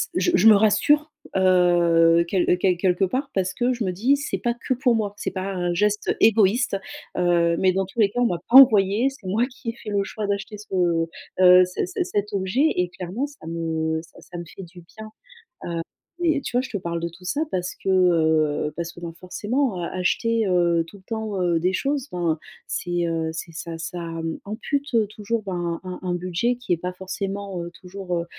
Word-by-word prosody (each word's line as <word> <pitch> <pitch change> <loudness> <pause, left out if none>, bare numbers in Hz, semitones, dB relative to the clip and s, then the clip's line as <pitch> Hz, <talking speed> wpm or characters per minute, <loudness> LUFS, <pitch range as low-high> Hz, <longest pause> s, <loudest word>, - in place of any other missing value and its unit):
je 350 - +2
me - - +3
je 225 - +5
me 215 - +9
rassure, 255 +9 +3 0.2
heu, 175 -2 +4
quel 180 -1 +2
quel 180 -1 +2
quelque 180 +1 +1
part 265 +8 -2
parce 185 -1 -1
que 250 +1 +1
je 235 -3 -3
me 185 - -1
dis: 245 +10 +2
«C'est 285 - -3
pas 240 0 -1
que 240 +2 -2
pour 245 -1 +2
moi, 205 -2 -1
c'est - - -3
pas 190 +1 -4
un 175 -1 -1
geste 210 +3 +1
égoïste», 220 0 +3 0.4
heu, 170 -1 +3
mais 185 -1 +4
dans 190 0 0
tous 195 +5 -10
les 205 -2 +5
cas 245 - -4
on - - +4
m'a 175 -4 -2
pas 255 - +8
envoyée, 220 -1 +6
c'est 255 -8 -12
moi 220 +6 +1
qui 250 -3 -8
ai - - -3
fait 215 - -9
le 200 -1 +1
choix 210 +1 -5
d'acheter 205 +1 -3
ce, 210 - -13 0.7
heu, 180 0 +8
c 180 - -3
c - - -2
cet 205 0 -3
objet 195 +7 0
et 180 -1 0
clairement 195 +10 -4
ça 285 - -15
me 160 -1 -2
ça - - -17
ça 175 - -10
me 170 - -6
fait 190 - -11
du 175 +1 -13
bien, 220 +6 -12
heu. - - -15 1.1
Et 310 -4 +2
tu - - -6
vois, 250 - +3
je - - -8
te 205 - -2
parle 170 -1 -3
de 170 - -2
tout 180 +2 -16
ça 285 - -1
parce 180 0 -2
que, 190 - +1
heu, 160 -5 +2
parce 170 0 -4
que, 175 - -12
ben, 170 -1 -6
forcément, 210 +4 -1
heu, - - -2
acheter, 220 +4 0
heu, 175 -2 +2
tout 200 - -13
le 190 - -18
temps, 220 -4 -3
heu, 170 -2 +1
des 185 +2 0
choses, 280 +2 -1
ben, 170 -3 -1 0.3
c'est, 175 -1 -2
heu, 165 -1 -1
c'est 165 +1 -7
ça 165 0 -6
ça, 170 +2 -6
mmh, 165 -1 -4
ampute, 280 +6 -3
heu, 220 -2 +3
toujours, 215 +1 -3
ben, 175 -3 -3
un 185 -1 -6
un 180 -1 -1
budget 185 +8 -1
qui 245 -7 -3
est 170 - +1
pas 180 +1 -5
forcément, 195 -1 -5
heu, 170 - -6
toujours, 180 -1 -5
heu, 170 - -2
190 Hz, 225 wpm, -23 LUFS, 175-220 Hz, 1.1 s, me